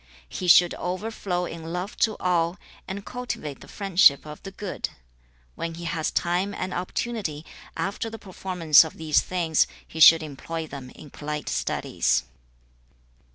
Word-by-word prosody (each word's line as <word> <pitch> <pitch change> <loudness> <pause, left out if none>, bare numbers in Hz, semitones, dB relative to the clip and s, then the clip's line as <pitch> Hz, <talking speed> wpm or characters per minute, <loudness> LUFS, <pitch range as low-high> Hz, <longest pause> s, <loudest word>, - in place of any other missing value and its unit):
He 185 - -4
should 175 0 +7
overflow 185 -1 -2
in 165 -1 -7
love 180 +4 -4
to 220 -2 +1
all, 175 0 +1 0.3
and 200 +1 -6
cultivate 245 - -5
the - - -12
friendship 185 -9 +4
of 150 0 -9
the 195 - -7
good. 195 0 -5 0.6
When 165 - -5
he 170 - -8
has 165 -2 -1
time 180 +4 0
and 185 0 -4
opportunity, 180 -4 -3 0.3
after 200 +3 -2
the 225 - -8
performance 180 -6 +4
of 160 - -8
these 155 -2 +2
things, 170 -4 +1 0.2
he 160 - -8
should 160 0 +9
employ 160 +2 -5
them 140 -4 -9
in 145 +2 -13
polite 150 0 -5
studies.' 60 +1 0
175 Hz, 150 wpm, -25 LUFS, 155-190 Hz, 0.6 s, should